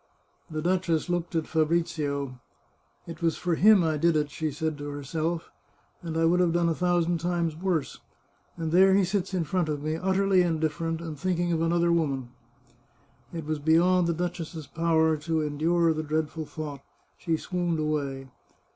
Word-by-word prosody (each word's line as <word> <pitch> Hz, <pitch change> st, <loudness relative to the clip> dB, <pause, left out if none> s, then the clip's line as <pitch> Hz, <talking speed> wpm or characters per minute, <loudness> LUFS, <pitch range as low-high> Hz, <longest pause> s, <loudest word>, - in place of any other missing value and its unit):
The 155 Hz, -1 st, -4 dB
duchess 175 Hz, -2 st, 0 dB
looked 175 Hz, -1 st, -2 dB
at 160 Hz, -1 st, +1 dB
Fabrizio. 155 Hz, -5 st, -1 dB, 0.3 s
" -, -, -40 dB
It 165 Hz, -1 st, -8 dB
was 165 Hz, -1 st, +1 dB
for 175 Hz, -1 st, -1 dB
him 200 Hz, +2 st, +6 dB
I 160 Hz, -2 st, +1 dB
did 165 Hz, +2 st, +2 dB
it," 150 Hz, -1 st, 0 dB
she 155 Hz, +1 st, -2 dB
said 155 Hz, +2 st, -2 dB
to 145 Hz, 0 st, -5 dB
herself, 160 Hz, +4 st, -3 dB, 0.3 s
" -, -, -38 dB
and 165 Hz, -2 st, -4 dB
I 165 Hz, -, +3 dB
would 175 Hz, +2 st, +3 dB
have 175 Hz, -2 st, +3 dB
done 170 Hz, -1 st, +2 dB
a -, -, +2 dB
thousand 175 Hz, 0 st, +1 dB
times 170 Hz, -2 st, -1 dB
worse. 170 Hz, -3 st, -2 dB, 0.6 s
And 160 Hz, -1 st, -3 dB
there 190 Hz, +2 st, +6 dB
he 200 Hz, -, +4 dB
sits 190 Hz, +1 st, -1 dB
in 185 Hz, -3 st, 0 dB
front 175 Hz, -1 st, -1 dB
of 145 Hz, -1 st, -3 dB
me, 155 Hz, +1 st, -1 dB
utterly 190 Hz, +1 st, +2 dB
indif 160 Hz, -3 st, +1 dB
ferent, 165 Hz, +1 st, -3 dB
and 160 Hz, -4 st, -7 dB
thinking 175 Hz, 0 st, 0 dB
of 165 Hz, -, 0 dB
another 170 Hz, +1 st, +2 dB
woman! 140 Hz, -7 st, 0 dB, 0.5 s
" -, -, -36 dB, 0.2 s
It 165 Hz, -2 st, -6 dB
was 155 Hz, 0 st, -2 dB
beyond 170 Hz, +4 st, +3 dB
the 170 Hz, -, +1 dB
duchess's 170 Hz, -2 st, -4 dB
power 160 Hz, +1 st, +2 dB
to 160 Hz, +1 st, -1 dB
endure 160 Hz, +3 st, +1 dB
the 155 Hz, -, -2 dB
dreadful 155 Hz, 0 st, -2 dB
thought; 145 Hz, -3 st, -6 dB, 0.4 s
she 165 Hz, -2 st, 0 dB
swooned 175 Hz, -1 st, -2 dB
away. 140 Hz, -3 st, -2 dB
165 Hz, 185 wpm, -27 LUFS, 155-175 Hz, 0.6 s, him